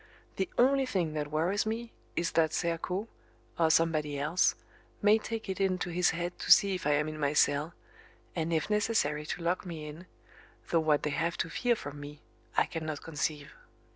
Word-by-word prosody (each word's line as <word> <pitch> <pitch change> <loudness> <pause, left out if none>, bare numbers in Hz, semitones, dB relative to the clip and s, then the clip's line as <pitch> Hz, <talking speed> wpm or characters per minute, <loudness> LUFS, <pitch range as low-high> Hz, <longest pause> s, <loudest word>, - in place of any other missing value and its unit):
The 370 - -1
only 270 +2 +4
thing 175 -9 -1
that 150 -1 -3
worries 175 +8 0
me 230 +1 -3 0.2
is 170 0 0
that 160 -1 +2
Serko, 180 +4 -1 0.5
or 165 -1 +4
somebody 155 -3 +2
else 155 +6 +2 0.4
may 210 +2 +5
take 225 0 -5
it 190 0 -3
into 185 -2 0
his 180 +1 +3
head 175 +1 -3
to - - -1
see 200 -1 +7
if 180 -5 -3
I 150 - +4
am 150 +1 +1
in 155 0 -6
my 145 -1 +1
cell, 150 +2 +2 0.6
and 165 -1 -1
if 160 -2 +1
necessary 210 -9 +1
to 170 - -4
lock 175 +2 0
me 165 -4 -6
in, 155 +5 -9 0.6
though 165 - +4
what 155 -2 +2
they 150 - 0
have 170 +3 -1
to 165 - -2
fear 245 -1 +1
from 145 -7 -8
me 145 +1 -9 0.4
I - - +5
cannot 155 -3 -5
conceive. 150 -2 -3
165 Hz, 190 wpm, -30 LUFS, 150-190 Hz, 0.6 s, see